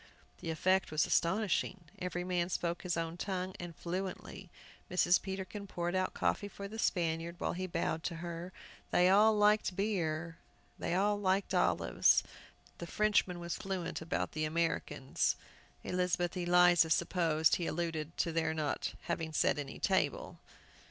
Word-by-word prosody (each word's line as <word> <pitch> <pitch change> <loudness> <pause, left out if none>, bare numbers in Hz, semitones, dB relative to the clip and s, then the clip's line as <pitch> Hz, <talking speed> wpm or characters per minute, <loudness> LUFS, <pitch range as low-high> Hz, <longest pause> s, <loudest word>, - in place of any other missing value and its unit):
The - - -5
effect 185 +4 +2
was 155 0 +2
astonishing. 190 +1 +1 0.2
Every 180 -1 -3
man 180 -1 0
spoke 170 -1 -2
his 175 -2 -2
own 165 0 -3
tongue, 185 0 -3
and 175 -2 -7
fluently. 185 +1 -5 0.4
Mrs. 180 0 +3
Peterkin 195 +1 -5
poured 175 -1 -3
out 185 0 0
coffee 205 - 0
for 200 0 -7
the 220 +2 -8
Spaniard, 170 -3 0
while - - -2
he 185 +1 -3
bowed 165 -2 -1
to 170 - -2
her. 170 +1 -6 0.4
They 180 +1 +4
all 210 +3 +5
liked 210 -2 +3
beer, 170 -5 -1 0.4
they 170 - -1
all 205 +2 +2
liked 195 0 +1
olives. - - +3 0.6
The 170 - -6
Frenchman 205 -4 +1
was 170 0 -4
fluent 190 -4 -4
about 160 -1 -2
"les 155 0 0
moeurs 155 - -9 0.3
Américaines." 130 - -1 0.5
Elizabeth 180 -1 0
Eliza 175 -1 +5
supposed 160 -1 +2
he 175 - -2
alluded 165 -1 -3
to 165 - 0
their 160 -1 0
not 155 -2 -2
having 165 -2 -3
set 150 - +2
any 140 -2 -6
table. - - 0
175 Hz, 150 wpm, -33 LUFS, 165-190 Hz, 0.6 s, all